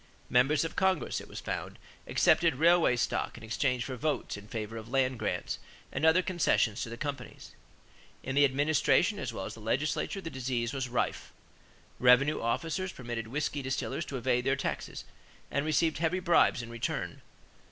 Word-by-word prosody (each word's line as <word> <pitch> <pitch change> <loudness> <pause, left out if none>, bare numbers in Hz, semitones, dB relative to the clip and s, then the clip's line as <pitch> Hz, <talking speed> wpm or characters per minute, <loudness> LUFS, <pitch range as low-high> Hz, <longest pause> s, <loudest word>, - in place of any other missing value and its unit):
Members 135 +6 +4
of 165 - -5
Congress, 190 -4 +1
it - - -12
was - - -7
found, - - -4 0.3
accepted 165 -4 +4
railway 165 -2 +4
stock 120 - -1
in 115 - -11
exchange 125 +3 0
for 130 - -4
votes 150 +4 -2
in 105 0 -10
favor 110 0 -5
of 115 0 -7
land 130 -2 +1
grants - - -2 0.3
and 160 - +1
other 170 +3 +5
concessions 160 - +1
to 115 - -3
the 120 - -7
companies. 145 0 -6 0.7
In 135 - -3
the 145 +1 +5
administration 145 +7 +3
as - - -3
well 95 - -5
as - - -6
the - - -11
legislature 150 - -1
the 165 -3 -6
disease 125 -1 -2
was 130 -2 -3
rife. 120 - -2 0.7
Revenue 130 +4 +5
officers 165 +11 -1
permitted 120 -3 -5
whisky 145 +3 -2
distillers 130 +5 -2
to 135 - -5
evade 125 0 +1
their 135 +1 +2
taxes 140 - -4 0.5
and 140 - 0
received 155 +1 +2
heavy 170 +3 +1
bribes 170 -8 +3
in 115 - -8
return. 120 -1 -3
135 Hz, 175 wpm, -30 LUFS, 120-160 Hz, 0.7 s, other